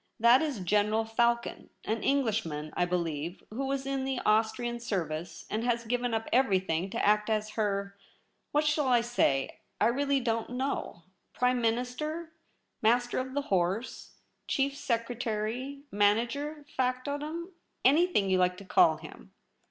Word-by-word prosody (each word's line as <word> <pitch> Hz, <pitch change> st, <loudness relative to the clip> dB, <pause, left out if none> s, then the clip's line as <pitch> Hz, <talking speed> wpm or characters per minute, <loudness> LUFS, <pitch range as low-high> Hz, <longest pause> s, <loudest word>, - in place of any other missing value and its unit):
That 235 Hz, +3 st, +6 dB
is 290 Hz, -10 st, -2 dB
General 210 Hz, +4 st, +2 dB
Falcon, 235 Hz, +1 st, 0 dB, 0.2 s
an 220 Hz, 0 st, -1 dB
Englishman, 210 Hz, -, 0 dB
I 175 Hz, -, +2 dB
believe, 170 Hz, -1 st, -3 dB
who 265 Hz, +5 st, -3 dB
was 270 Hz, 0 st, -2 dB
in 275 Hz, -1 st, -1 dB
the 265 Hz, -1 st, -1 dB
Austrian 230 Hz, +2 st, +1 dB
service, 170 Hz, -7 st, -4 dB
and 220 Hz, +2 st, -2 dB
has 235 Hz, -1 st, 0 dB
given 245 Hz, +1 st, 0 dB
up 225 Hz, 0 st, -1 dB
everything 190 Hz, -8 st, +2 dB
to -, -, -1 dB
act 210 Hz, +1 st, +3 dB
as 215 Hz, -1 st, 0 dB
her 200 Hz, -2 st, -1 dB, 0.3 s
— -, -, -46 dB
what 295 Hz, +1 st, +2 dB
shall 300 Hz, -2 st, +2 dB
I 245 Hz, -2 st, +4 dB
say? 185 Hz, -, 0 dB
— -, -, -46 dB
I -, -, +4 dB
really 275 Hz, +3 st, +2 dB
don't 230 Hz, -2 st, -1 dB
know 250 Hz, -8 st, -3 dB
— -, -, -47 dB
Prime 250 Hz, 0 st, +2 dB
Tvlinister, 250 Hz, +8 st, -2 dB, 0.5 s
Master 240 Hz, +3 st, +2 dB
of 260 Hz, +1 st, -5 dB
the 285 Hz, -, 0 dB
Horse, 190 Hz, +6 st, -1 dB, 0.3 s
Chief 275 Hz, 0 st, 0 dB
Secretary, 240 Hz, +2 st, -2 dB
manager, 240 Hz, +9 st, +1 dB
factotum 290 Hz, +7 st, -2 dB, 0.2 s
— -, -, -21 dB
anything 295 Hz, -, +4 dB
you 190 Hz, -1 st, +2 dB
like 180 Hz, 0 st, +2 dB
to 200 Hz, -, -10 dB
call 355 Hz, -, +4 dB
him.' -, -, -12 dB
235 Hz, 155 wpm, -30 LUFS, 205-265 Hz, 0.5 s, That